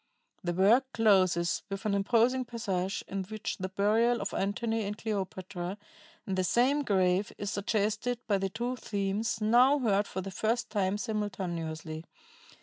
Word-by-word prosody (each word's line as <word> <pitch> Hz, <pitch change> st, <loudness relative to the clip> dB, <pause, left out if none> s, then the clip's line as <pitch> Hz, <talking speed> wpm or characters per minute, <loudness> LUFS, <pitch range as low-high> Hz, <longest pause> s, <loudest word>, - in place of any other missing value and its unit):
"The 175 Hz, -1 st, -1 dB
work 210 Hz, +9 st, +5 dB
closes 185 Hz, -6 st, +3 dB
with 195 Hz, +2 st, -5 dB
an 210 Hz, -, +1 dB
imposing 235 Hz, +6 st, +3 dB
passage 200 Hz, -6 st, -2 dB
in 195 Hz, 0 st, -3 dB
which 215 Hz, +2 st, -4 dB
the 185 Hz, 0 st, -3 dB
burial 220 Hz, +5 st, +2 dB
of -, -, -4 dB
Antony 225 Hz, +3 st, -1 dB
and 205 Hz, +1 st, -4 dB
Cleopatra 190 Hz, -3 st, -4 dB, 0.5 s
in 195 Hz, -, -3 dB
the 185 Hz, 0 st, +1 dB
same 255 Hz, +10 st, +3 dB
grave 190 Hz, -4 st, +2 dB
is 200 Hz, -1 st, -3 dB
suggested 215 Hz, +4 st, 0 dB
by 200 Hz, -3 st, +1 dB
the 195 Hz, 0 st, -1 dB
two 240 Hz, +5 st, -3 dB
themes 205 Hz, +2 st, -2 dB
now 245 Hz, +6 st, +5 dB
heard 210 Hz, -6 st, +1 dB
for 190 Hz, -, -4 dB
the 195 Hz, +1 st, -6 dB
first 230 Hz, +5 st, -1 dB
time 200 Hz, -1 st, +1 dB
simultaneously. 170 Hz, -8 st, -4 dB
205 Hz, 150 wpm, -30 LUFS, 190-230 Hz, 0.5 s, work